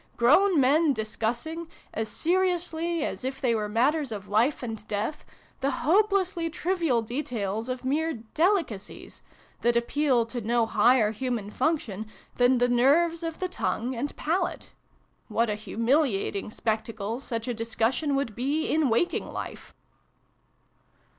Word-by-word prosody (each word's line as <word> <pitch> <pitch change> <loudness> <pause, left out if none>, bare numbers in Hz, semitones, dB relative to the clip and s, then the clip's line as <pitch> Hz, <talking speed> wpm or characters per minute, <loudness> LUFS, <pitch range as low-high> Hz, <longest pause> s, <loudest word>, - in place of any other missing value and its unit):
" - - -33
Grown 305 +9 +5
men 290 +3 +4
discussing, 235 +9 -3 0.3
as 220 0 -2
seriously 345 - 0
as - - -5
if 265 +1 -3
they 250 -4 +2
were 210 -2 -1
matters 265 +5 +1
of 205 -2 -6
life 230 +8 +2
and 220 -3 -6
death, 220 +9 -3 0.4
the 275 - +1
hopelessly 375 0 +2
trivial 330 -8 0
details 225 -3 -3
of 255 0 -4
mere 315 +5 +1
delicacies, 270 - -1 0.4
that 240 0 +2
appeal 250 0 +2
to 235 +1 -4
no 230 +1 +2
higher 220 0 +4
human 225 -2 -3
function 235 - -1 0.3
than 245 +1 +4
the 245 0 +3
nerves 300 +8 +3
of 330 -1 -4
the 370 - -1
tongue 260 -8 -2
and 260 +4 -4
palate! 335 +5 -2 0.5
What 230 -1 +1
a - - +1
humiliating 215 0 0
spectacle 220 0 -2
such 230 -4 -4
a 245 - 0
discussion 230 +5 0
would 275 -5 -1
be 285 +8 -1
in 310 -3 +2
waking 235 +10 0
life - - -7
255 Hz, 140 wpm, -27 LUFS, 225-315 Hz, 0.5 s, Grown